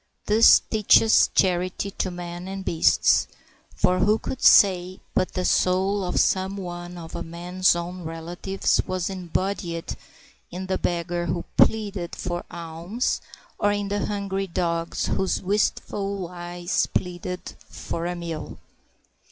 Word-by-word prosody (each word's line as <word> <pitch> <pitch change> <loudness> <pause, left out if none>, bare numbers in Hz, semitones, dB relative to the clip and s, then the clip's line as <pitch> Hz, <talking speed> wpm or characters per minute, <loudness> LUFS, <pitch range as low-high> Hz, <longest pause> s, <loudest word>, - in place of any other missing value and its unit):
This 215 +2 +7
teaches 220 +1 +4
charity 185 +1 +1
to 190 - -2
men 175 0 -7
and 195 0 -6
beasts; 165 - +3 0.5
for 180 0 +2
who 210 +4 +3
could 255 +3 -6
say 185 -2 +5
but 185 - 0
the 185 - -2
soul 190 +2 +2
of 180 - -1
some 190 +1 +1
one 175 -1 -7
of 165 0 -9
a 170 - -4
man's 175 +2 +1
own 175 +1 -5
relatives 170 +4 -1
was 185 0 -2
embodied 180 -2 -3 0.5
in 185 +2 -6
the 190 0 -1
beggar 175 0 -2
who 170 +1 -2
pleaded 205 -5 +2
for 175 -1 -4
alms, 170 +8 -3 0.4
or 205 -1 +3
in 205 -1 -2
the 205 0 -1
hungry 195 -1 -2
dogs 170 -1 -1
whose 190 -1 0
wistful 200 -1 -1
eyes 175 0 -2
pleaded 180 0 -3 0.2
for 170 +1 -4
a 175 - -3
meal? 170 -2 -6
180 Hz, 135 wpm, -24 LUFS, 175-195 Hz, 0.5 s, This